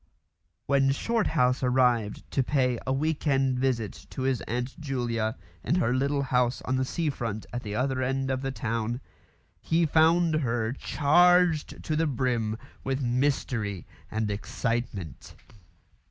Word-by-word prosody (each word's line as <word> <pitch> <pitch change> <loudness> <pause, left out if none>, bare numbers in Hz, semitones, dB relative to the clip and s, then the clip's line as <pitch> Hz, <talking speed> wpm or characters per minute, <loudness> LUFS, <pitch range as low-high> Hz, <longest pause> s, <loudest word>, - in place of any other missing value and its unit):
When 135 -1 +3
Shorthouse 145 - +1
arrived 125 -4 +2
to 135 - +2
pay 125 -3 +1
a - - +1
"week 155 +3 -1
end" 135 -2 +2
visit 120 -6 -2
to 130 - -5
his 130 -2 +1
Aunt 125 +6 -3
Julia 120 -6 -2 0.3
in - - +1
her 120 -9 +2
little 140 +2 +1
house 125 -1 +1
on 130 - 0
the 130 - +1
sea 160 +2 -1
front 110 -5 -4
at 120 - -3
the 105 -3 -5
other 130 +1 0
end 135 +1 0
of 130 0 -1
the 135 - -2
town, 115 -2 -2 0.6
he 165 +1 +1
found 160 +1 +4
her 115 -5 0
charged 175 +3 +3
to 155 - -1
the 160 +1 +2
brim 120 -5 0 0.3
with 135 0 -1
mystery 120 - -1 0.2
and 110 -1 -1
excitement. 105 - -4
130 Hz, 145 wpm, -27 LUFS, 120-140 Hz, 0.6 s, found